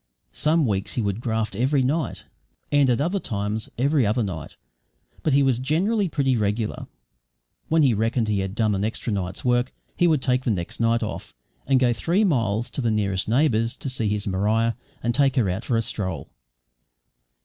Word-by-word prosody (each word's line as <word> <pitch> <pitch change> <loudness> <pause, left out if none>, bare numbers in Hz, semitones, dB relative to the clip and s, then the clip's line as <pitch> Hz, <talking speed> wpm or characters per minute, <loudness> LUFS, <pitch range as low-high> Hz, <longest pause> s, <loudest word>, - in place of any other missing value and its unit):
Some 155 0 +2
weeks 100 -4 -1
he 120 - -1
would 100 +2 -2
graft 110 -3 -2
every 130 +5 +2
night, 145 +1 -1 0.5
and 145 -2 +4
at 120 - +2
other 175 +7 0
times 105 - -3
every 140 +2 +2
other 110 +3 +1
night, 85 -7 -6 0.7
but 155 - +1
he 140 0 +5
was 130 -3 +2
generally 185 - +1
pretty 135 -4 +1
regular. 105 0 -2 0.8
When 160 -1 +4
he 130 -4 +4
reckoned 115 +2 0
he 105 -2 +1
had 95 0 -3
done 110 -2 +1
an 100 0 -1
extra 110 +1 -2
night's 95 +1 -4
work, 125 +1 +2 0.2
he 175 - +3
would 155 -5 +2
take 125 0 +1
the 130 - -1
next 90 -6 -3
night 115 0 +2
off 110 - -6 0.3
and 135 -1 +4
go 125 -2 +3
three 170 - +1
miles 115 - 0
to - - -3
the 120 - +1
nearest 100 -3 0
neighbour's 115 -3 +2
to 135 - -5
see 115 -5 -1
his 105 -1 -2
Maria 105 +4 +1 0.3
and 120 +1 +1
take 135 +1 +2
her 120 -7 +2
out 95 +6 -4
for 120 - 0
a 115 - +1
stroll. 95 -10 -3
115 Hz, 195 wpm, -24 LUFS, 105-135 Hz, 0.8 s, he